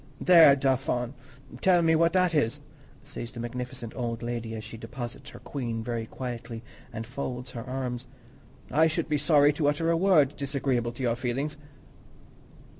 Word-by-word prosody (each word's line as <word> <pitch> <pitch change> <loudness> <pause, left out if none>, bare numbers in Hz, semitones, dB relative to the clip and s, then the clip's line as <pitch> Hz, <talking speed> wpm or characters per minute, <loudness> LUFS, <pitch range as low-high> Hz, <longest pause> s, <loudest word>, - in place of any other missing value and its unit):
"There, 165 -6 +8
Dauphin, 130 -2 0 0.5
tell 180 -2 +4
me 160 0 +4
what 165 +1 +3
that 180 -2 +3
is!" 145 -2 +1 0.4
says 140 -4 -7
this 120 - -10
magnificent 125 0 -5
old 120 -2 -3
lady, 115 -1 -4
as 110 - -6
she 115 +1 -9
deposits 120 +2 -7
her - - -11
queen 115 -5 -4
very 115 -1 -3
quietly 120 -2 -6 0.3
and 115 0 -5
folds 125 +1 -5
her 115 - -6
arms. 125 -1 -4 0.6
"I 160 +2 +5
should 160 +1 -1
be 150 -1 +1
sorry 145 -1 +5
to 150 0 0
utter 165 +3 +1
a - - +3
word 165 -6 +4
disagreeable 135 -4 -1
to 130 - -6
your 120 -2 +1
feelings." 130 +5 -2
130 Hz, 165 wpm, -28 LUFS, 120-150 Hz, 0.6 s, There